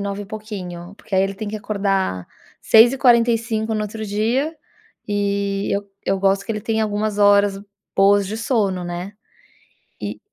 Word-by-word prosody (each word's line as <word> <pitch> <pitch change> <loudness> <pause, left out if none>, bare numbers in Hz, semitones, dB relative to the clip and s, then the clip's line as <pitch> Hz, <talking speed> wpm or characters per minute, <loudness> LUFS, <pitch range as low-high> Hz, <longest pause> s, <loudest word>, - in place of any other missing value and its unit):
21h 200 0 -3
e - - -11
pouquinho. 195 -4 -7
Porque 220 -3 -7
aí 190 - +4
ele 195 0 -1
tem 215 +2 -6
que 215 - -4
acordar 195 - -1 0.3
6h45 230 -2 +4
no 215 - -1
outro 215 +1 -5
dia 235 +10 -1 0.5
e 200 -1 -1
eu 200 0 -3 0.2
eu 195 - 0
gosto 195 +1 +1
que - - -6
ele 210 -1 -2
tem 220 +1 -1
algumas 210 -1 -1
horas 200 -1 +4 0.3
boas 200 0 +4
de 210 +3 -4
sono, 215 -6 0
né. 175 +2 -5 0.9
E - - -5
205 Hz, 155 wpm, -21 LUFS, 195-220 Hz, 0.9 s, aí